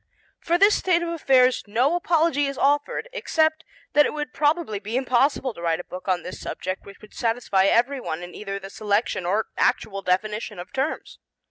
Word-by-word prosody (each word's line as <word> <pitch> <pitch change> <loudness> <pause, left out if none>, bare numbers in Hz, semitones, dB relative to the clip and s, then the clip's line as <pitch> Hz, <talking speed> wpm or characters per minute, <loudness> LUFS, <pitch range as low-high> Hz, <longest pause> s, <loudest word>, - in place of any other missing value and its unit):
For 340 +1 +1
this 400 +3 +5
state 345 -2 +2
of 340 - -3
affairs 260 -6 +3
no 245 +9 +2
apology 330 -4 +2
is 275 -1 -5
offered 290 - +1
except 315 -9 +1 0.3
that 295 0 +5
it - - -5
would 295 -4 -4
probably 295 -8 0
be 215 +4 -3
impossible 260 0 +1
to 170 - -11
write 165 -1 0
a - - -5
book 180 +2 -9
on 185 -2 0
this 180 - -8
subject 185 +1 -5
which 200 - -13
would 215 - -15
satisfy 225 -5 +1
everyone 230 - +1
in 175 - -9
either 195 -1 -5
the 195 0 -9
selection 205 -3 -1
or 210 +4 0
actual 195 -1 +1
definition 210 +4 -1
of 180 +4 -9
terms. 270 +3 -3
240 Hz, 190 wpm, -24 LUFS, 195-295 Hz, 0.3 s, this